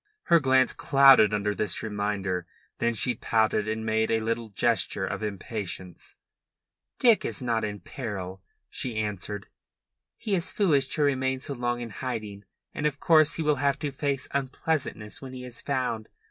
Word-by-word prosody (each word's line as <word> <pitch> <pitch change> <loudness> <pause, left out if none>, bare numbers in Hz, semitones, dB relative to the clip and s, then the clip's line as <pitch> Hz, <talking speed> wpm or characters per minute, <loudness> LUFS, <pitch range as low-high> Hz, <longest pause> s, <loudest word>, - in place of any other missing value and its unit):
Her 170 -1 +5
glance 130 -2 +3
clouded 135 -6 +6
under 105 -1 0
this 105 -2 -1
reminder. 100 -4 -2 0.3
Then 115 0 +1
she 125 +3 +1
pouted 110 -2 +1
and 110 +1 -2
made 110 0 +1
a 115 - +2
little 115 0 -2
gesture 100 - +1
of - - -4
impatience. 100 -3 -5 0.8
"Dick 235 -4 +5
is - - -2
not 115 -3 -1
in 105 -2 -4
peril," 95 -6 -6 0.3
she 125 -3 -2
answered. 105 -1 -3 0.7
"He 210 - -2
is 175 -2 +1
foolish 155 - +3
to 150 - +1
remain 130 -2 +1
so 140 +2 -4
long 120 -1 -2
in 115 -2 -6
hiding, 105 -4 -5 0.3
and 150 - 0
of 140 -1 -4
course 155 -1 +5
he 165 - -2
will 150 -1 +2
have 140 +1 +1
to 145 -1 -3
face 140 0 -2
unpleasantness 135 -4 -2
when 130 -1 -8
he 125 -1 -7
is 125 -1 -6
found. 125 -6 -2
120 Hz, 165 wpm, -27 LUFS, 105-140 Hz, 0.8 s, clouded